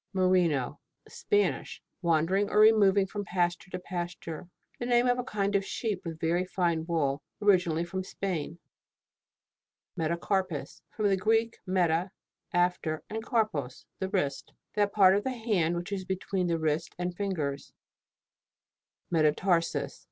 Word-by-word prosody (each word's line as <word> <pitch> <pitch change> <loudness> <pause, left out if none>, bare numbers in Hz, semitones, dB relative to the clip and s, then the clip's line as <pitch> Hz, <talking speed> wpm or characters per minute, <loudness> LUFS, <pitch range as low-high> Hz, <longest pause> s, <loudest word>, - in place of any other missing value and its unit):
MERINO 180 -8 +2 0.3
Spanish. 415 -1 0 0.2
Wandering 170 +4 +2
or - - -1
removing 205 -3 +6
from 205 +1 -5
pasture 175 0 -1
to 180 - -4
pasture. 175 -2 -6 0.3
The 240 - -3
name 240 0 +4
of 245 0 +2
a - - -1
kind 205 -3 -1
of 200 - +3
sheep 205 -1 -3
with 165 -2 -6
very 170 +3 +1
fine 170 -3 -1
wool, 150 -4 0 0.2
originally 180 -5 +3
from 190 +2 -4
Spain. 175 -4 -4 1.4
METACARPUS. 170 +1 -2
From 215 -2 -1
the 195 -1 +3
Greek, 225 +3 +1
meta, 180 -1 +2 0.4
after, 175 -3 0
and 220 +1 -3
karpos, 215 - -1
the 190 - -2
wrist. 145 -9 -2 0.2
That 205 -1 +1
part 190 -2 +6
of 205 - 0
the - - -1
hand 190 -8 +1
which 175 +3 -5
is 195 -2 -2
between 190 0 -2
the 170 -1 +1
wrist 160 +1 -1
and 180 0 -3
fingers. 155 -9 -3 1.4
METATARSUS. 165 +2 +1
185 Hz, 135 wpm, -29 LUFS, 165-200 Hz, 1.4 s, removing